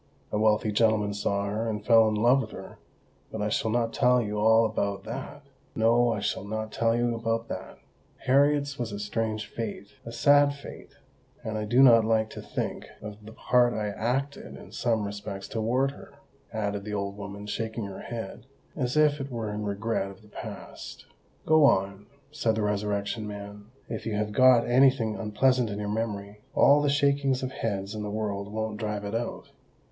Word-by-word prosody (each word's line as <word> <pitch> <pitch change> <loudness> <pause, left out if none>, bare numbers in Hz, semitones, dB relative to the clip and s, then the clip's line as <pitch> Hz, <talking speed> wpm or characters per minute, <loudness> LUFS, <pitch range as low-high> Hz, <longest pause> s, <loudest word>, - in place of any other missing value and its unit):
A 105 - 0
wealthy 110 0 +2
gentleman 105 -1 +2
saw 100 0 -1
her, 110 +3 -2
and 105 -1 -4
fell 115 -1 +6
in 110 - 0
love 120 +5 +4
with 110 - -6
her—but 110 - -12
I 105 +1 0
shall 110 - 0
not 115 0 0
tell 125 0 +4
you 105 -2 -2
all 110 +1 +5
about 100 -2 -2
that! 145 +5 -7 0.3
No—I 115 -1 +3
shall 100 - -2
not 110 +1 -4
tell 115 +1 +1
you 120 0 +1
about 115 0 -2
that! - - -7 0.5
Harriet's 140 +1 +3
was 120 -3 -3
a 100 - -5
strange 110 +1 -2
fate—a 105 0 -7
sad 145 +4 +4
fate; 140 - -11 0.5
and 110 - -4
I 105 0 -2
do 120 +5 +5
not 115 -4 +7
like 110 -1 +1
to - - -8
think - - -4
of 105 0 -9
the 110 - -10
part 120 +1 +2
I 105 -1 -2
acted 130 +7 -3
in - - -13
some 115 -4 0
respects 100 -1 -6
towards 125 +5 0
her," - - -14 0.4
added 100 -2 -2
the 105 0 -4
old 100 0 -3
woman, 100 0 -8
shaking 110 +1 -3
her 100 -1 -7
head, 115 +1 -7 0.3
as 130 0 -1
if 150 -1 +4
it 135 - -5
were 115 -4 -4
in 105 0 -4
regret 100 0 -2
of 100 +1 -14
the 105 - -18
past. - - -9 0.4
"Go 155 0 +5
on," 100 -4 +1 0.2
said 115 -7 0
the 110 - -1
Resurrection 105 +1 -1
Man. 100 0 -8 0.2
"If 115 0 -5
you 110 - -1
have 105 0 -1
got 130 +1 +6
any 130 +3 +6
thing 115 -5 -2
unpleasant 125 +3 +1
in 100 - -4
your 105 0 -3
memory, 105 -2 -4
all 145 +1 +6
the 145 - +1
shakings 140 -2 +2
of 130 - -3
heads 100 -4 -3
in 110 - -5
the 105 - -4
world 105 -1 -3
won't 110 0 -3
drive 105 -2 -3
it 100 - -5
out." 115 +1 -4
110 Hz, 190 wpm, -27 LUFS, 105-120 Hz, 0.5 s, not